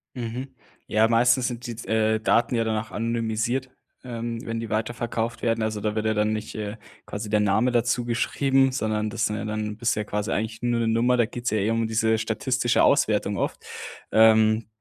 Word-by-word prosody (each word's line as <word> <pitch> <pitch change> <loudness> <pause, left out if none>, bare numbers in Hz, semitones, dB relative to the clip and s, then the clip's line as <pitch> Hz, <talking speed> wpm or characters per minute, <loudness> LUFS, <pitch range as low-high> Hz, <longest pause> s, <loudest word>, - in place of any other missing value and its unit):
Mhm. 125 +2 -5 0.3
Ja, 110 +1 +3
meistens 120 +2 +3
sind 120 0 -5
die, 120 - -4
äh, 110 0 +2
Daten 115 +2 +2
ja 115 - +2
dann 110 -1 -1
auch 110 - -17
anonymisiert, 115 +2 -1 0.3
ähm, 115 -1 -4
wenn 115 0 -3
die 115 - -5
weiterverkauft 115 +1 -2
werden. 115 -1 0
Also 110 -1 -2
da 105 0 -1
wird 110 0 -1
ja 110 - +2
dann 105 0 +1
nicht, 110 0 -5
äh, 105 +1 -5 0.3
quasi 105 +1 -6
der 105 0 +2
Name 105 +5 +2
dazu 120 0 +1
geschrieben, 135 +3 +2
sondern 110 -4 -1
das 115 -1 -1
sind 105 - -1
ja 110 - -4
dann 110 0 -2
du 105 - -5
bist 120 +3 0
ja 105 - -1
quasi 105 +2 -3
eigentlich 110 +2 -2
nur 120 -1 0
'ne 115 - 0
Nummer. 120 +3 +2
Da 120 - +4
geht's 120 +1 -4
ja 110 - 0
eh 105 +1 +1
um 115 0 0
diese 110 0 +2
statistische 120 +3 +1
Auswertung 105 -6 +2
oft. - - -3 0.5
Ähm, 110 0 +5
115 Hz, 205 wpm, -25 LUFS, 110-120 Hz, 0.5 s, Ähm